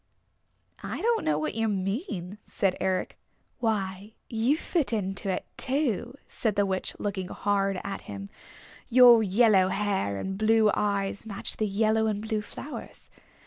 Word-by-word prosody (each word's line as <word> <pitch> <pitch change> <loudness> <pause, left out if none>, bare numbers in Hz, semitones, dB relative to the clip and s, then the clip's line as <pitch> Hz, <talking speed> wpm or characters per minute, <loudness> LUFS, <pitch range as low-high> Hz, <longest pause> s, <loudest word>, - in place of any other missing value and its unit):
"I - - -5
don't 465 +1 +1
know 150 -1 +1
what 155 0 -2
you 225 0 0
mean," 195 - -3
said 195 -2 0
Eric. 190 -1 -1 0.4
"Why, 205 -3 -2 0.2
you 235 +6 +2
fit 330 -5 -1
into 195 -2 -2
it, 190 - -2
too," 255 -3 0
said 220 -4 -1
the 205 -1 +3
Witch, 190 -1 -2
looking 195 -3 -3
hard 195 -1 0
at 195 0 -5
him. 100 -1 -7 0.6
"Your 240 -2 +8
yellow 205 -2 +4
hair 190 - -1
and 190 - -4
blue 220 -1 +4
eyes 200 +1 -1
match 200 -2 -3
the 215 - 0
yellow 220 +2 +2
and 210 -2 -1
blue 215 0 -2
flowers. 275 +7 -9
205 Hz, 145 wpm, -27 LUFS, 190-225 Hz, 0.6 s, Your